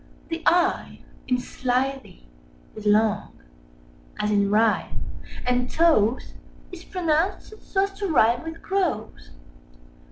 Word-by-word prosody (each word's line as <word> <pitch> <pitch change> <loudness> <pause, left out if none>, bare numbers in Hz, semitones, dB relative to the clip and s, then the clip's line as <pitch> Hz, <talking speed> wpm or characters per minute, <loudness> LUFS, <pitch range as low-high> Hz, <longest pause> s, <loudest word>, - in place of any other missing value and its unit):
The 330 0 -3
"i" 350 0 +1 0.2
in 250 - +2
"slithy" 255 - -3 0.5
is 215 -1 -5
long, 210 0 +2 0.8
as 210 0 0
in 200 -1 +2
"writhe"; 215 +1 +2 0.5
and 250 0 +1
"toves" 260 -9 +2 0.4
is 360 -1 -9
pronounced 355 +2 -1
so 385 0 0
as 395 - -2
to 405 - -1
rhyme 240 -7 +3
with 325 0 -8
"groves." 360 - -2
255 Hz, 115 wpm, -24 LUFS, 220-335 Hz, 0.8 s, rhyme